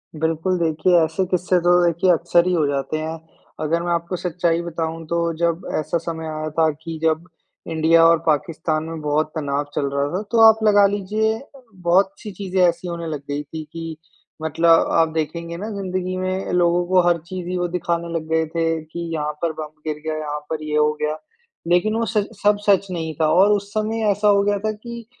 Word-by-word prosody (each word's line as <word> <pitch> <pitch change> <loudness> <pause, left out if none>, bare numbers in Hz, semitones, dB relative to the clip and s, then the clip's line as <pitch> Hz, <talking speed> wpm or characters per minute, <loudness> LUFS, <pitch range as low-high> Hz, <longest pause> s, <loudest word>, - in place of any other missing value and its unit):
बिल्कुल। 165 +4 0
देखिए 165 +2 +1
ऐसे 160 +4 0
किस्से 180 0 +2
तो 175 +1 +3
देखिए 170 +2 +2
अक्सर 170 +1 +3
ही 180 - +2
हो 160 -4 +2
जाते 140 +2 -2
हैं। 160 +1 -4 0.4
अगर 165 +2 0
मैं 175 - -1
आपको 170 +2 -2
सच्चाई 170 -1 0
बताऊँ 165 -1 -4
तो 170 - -1 0.2
जब 170 0 -1
ऐसा 160 +2 -1
समय 160 -1 -5
आया 155 0 -4
था 160 -1 +5
कि 165 -1 -5
जब 160 +2 +1 0.4
इंडिया 165 +1 +4
और 165 0 +5
पाकिस्तान 155 0 0
में 160 -1 -6
बहुत 150 +1 +1
तनाव 145 -1 -1
चल 140 - 0
रहा 140 0 +1
था 195 - -1
तो 230 - +3
आप 220 0 +6
लगा 205 -1 +6
लीजिए 215 +3 -1 0.5
बहुत 190 +2 +4
सी 210 - -7
चीज़ें 185 -1 -2
ऐसी 170 +1 -2
होने 170 -1 -4
लग 150 -3 -4
गई 145 +1 -2
थी 155 +2 -7
कि 165 -1 -6 0.4
मतलब 165 +1 +3
आप 165 -1 +3
देखेंगे 170 +2 -3
ना 210 +4 -5
ज़िंदगी 185 -1 -3
में 185 +1 -2
लोगों 175 0 +3
को 185 0 +4
हर 175 -1 +4
चीज़ 180 -1 -6
ही 180 - -2
वो 175 0 0
दिखाने 170 -1 -2
लग 160 -1 -3
गए 160 0 +2
थे 165 - +1 0.2
कि 160 +2 -9
यहाँ 150 -1 -2
पर 170 -1 +1
बम 155 -1 -6 0.2
गिर 150 -1 -2
गया, 155 0 -2
यहाँ 150 -1 -4
पर 155 -1 -3
ये 150 0 -3
हो 150 0 +4
गया। 150 +1 -1 0.5
लेकिन 180 +6 +2
वो 230 0 0
सच 210 -2 0 0.2
सब 205 0 +4
सच 195 0 +4
नहीं 160 -2 -3
था। 155 - +4
और 195 +4 +5
उस 200 0 -2
समय 220 +1 -1
ऐसा 205 +1 +1
हो 200 -1 +5
गया 205 0 +1
था 215 +1 -1
कि 235 +2 -9
170 Hz, 210 wpm, -21 LUFS, 160-185 Hz, 0.5 s, आप